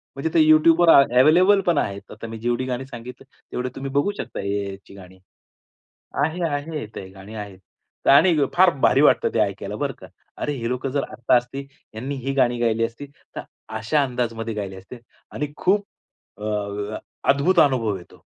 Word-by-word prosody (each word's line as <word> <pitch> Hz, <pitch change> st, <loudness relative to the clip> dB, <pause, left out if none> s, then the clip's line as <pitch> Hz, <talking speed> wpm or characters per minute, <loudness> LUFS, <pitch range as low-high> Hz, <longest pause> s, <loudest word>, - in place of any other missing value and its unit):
म्हणजे 140 Hz, +4 st, -2 dB
ते 170 Hz, -, +4 dB
यूट्यूबवर 160 Hz, +2 st, +5 dB
अ, -, -, +9 dB, 0.2 s
अव्हेलेबल 180 Hz, +8 st, +5 dB
पण 170 Hz, -3 st, +3 dB
आहे, 100 Hz, -7 st, -1 dB
आता 115 Hz, +2 st, -8 dB
मी 115 Hz, 0 st, -7 dB
जेवढी 120 Hz, +2 st, -1 dB
गाणी 130 Hz, 0 st, -3 dB
सांगितलं, 125 Hz, 0 st, -10 dB, 0.3 s
तेवढे 125 Hz, +1 st, -3 dB
तुम्ही 135 Hz, 0 st, -5 dB
बघू 145 Hz, +8 st, +1 dB
शकता, 120 Hz, -, -6 dB
एआयची 100 Hz, -1 st, -4 dB
गाणी. 95 Hz, -1 st, -14 dB, 1.1 s
आहे, 165 Hz, +3 st, -3 dB
आहे 145 Hz, -1 st, -4 dB
ते 95 Hz, -, -7 dB
गाणी 95 Hz, +3 st, -12 dB
आहेत 100 Hz, -3 st, -8 dB, 0.5 s
आणि 160 Hz, +5 st, +6 dB, 0.2 s
फार 185 Hz, +1 st, +6 dB
भारी 135 Hz, -, +4 dB
वाटत, 150 Hz, -, +4 dB
ते 115 Hz, -, +1 dB
ऐकायला 100 Hz, 0 st, -2 dB
बरं 140 Hz, +1 st, -2 dB
का. -, -, -12 dB, 0.3 s
अरे! 150 Hz, -, -2 dB
हे 115 Hz, -1 st, -3 dB
लोकं 125 Hz, +2 st, -2 dB
जर 140 Hz, 0 st, 0 dB
आत्ता 120 Hz, 0 st, +1 dB
असती, 125 Hz, +3 st, -5 dB, 0.3 s
यांनी 130 Hz, +6 st, -4 dB
ही 135 Hz, -, -1 dB
गाणी 125 Hz, -3 st, +2 dB
गायली 115 Hz, -1 st, +1 dB
असती, 115 Hz, +5 st, -8 dB, 0.3 s
तर -, -, -4 dB, 0.4 s
अशा 140 Hz, +7 st, +1 dB
अंदाजामध्ये 115 Hz, -3 st, -3 dB
गायली 100 Hz, -3 st, -5 dB
असते 95 Hz, +6 st, -11 dB, 0.3 s
आणि 145 Hz, 0 st, -4 dB
खूप 205 Hz, +2 st, +1 dB, 0.5 s
अ, -, -, -9 dB
अ, 105 Hz, 0 st, -3 dB, 0.3 s
अद्भुत 140 Hz, +7 st, +4 dB
अनुभव 115 Hz, -8 st, +2 dB
येतो. 90 Hz, -, -17 dB
125 Hz, 175 wpm, -22 LUFS, 105-145 Hz, 1.1 s, अ